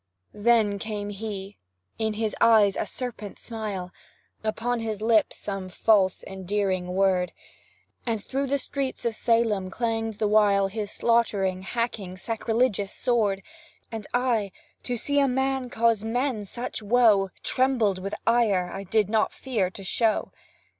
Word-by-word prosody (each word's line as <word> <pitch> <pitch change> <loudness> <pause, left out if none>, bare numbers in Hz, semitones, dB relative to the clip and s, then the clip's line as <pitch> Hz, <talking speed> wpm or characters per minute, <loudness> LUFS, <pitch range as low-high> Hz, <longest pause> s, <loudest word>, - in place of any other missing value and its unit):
Then 210 -2 +3
came 205 -1 -4
he 200 -1 -6 0.4
in 220 -1 0
his 215 0 -2
eyes 220 -4 +6
a - - -2
serpent 230 -5 -5
smile, 210 -6 -5 0.5
Upon 235 +2 -1
his 220 -2 -3
lips 220 0 +2
some 195 -2 -4
false, 190 -1 +3
endearing 190 -1 -2
word, 185 -2 +2 0.7
And 230 -3 -1
through 270 +6 -2
the 280 +1 +1
streets 270 -2 -3
of 235 - +1
Salem 220 -4 +1
clang'd 225 0 -2
the 215 - +1
while 205 -2 +4
His 210 0 -4
slaughtering, 200 -6 +1
hacking, 200 -3 -3
sacrilegious 225 -1 0
sword 210 -6 +1 0.5
And 220 -2 -6
I, 240 -5 +1 0.3
to 245 -1 -1
see 285 +5 +1
a 280 - +4
man 265 0 0
cause 230 -3 +2
men 235 -1 -1
such 240 +4 -5
woe, 210 -3 +4
Trembled 245 -7 +2
with 195 +2 -4
ire 210 -7 +2
I 195 0 -6
did 210 +2 +2
not 215 +1 +1
fear 220 -9 -1
to 195 +1 -10
show. 220 +3 0
215 Hz, 140 wpm, -26 LUFS, 195-235 Hz, 0.7 s, eyes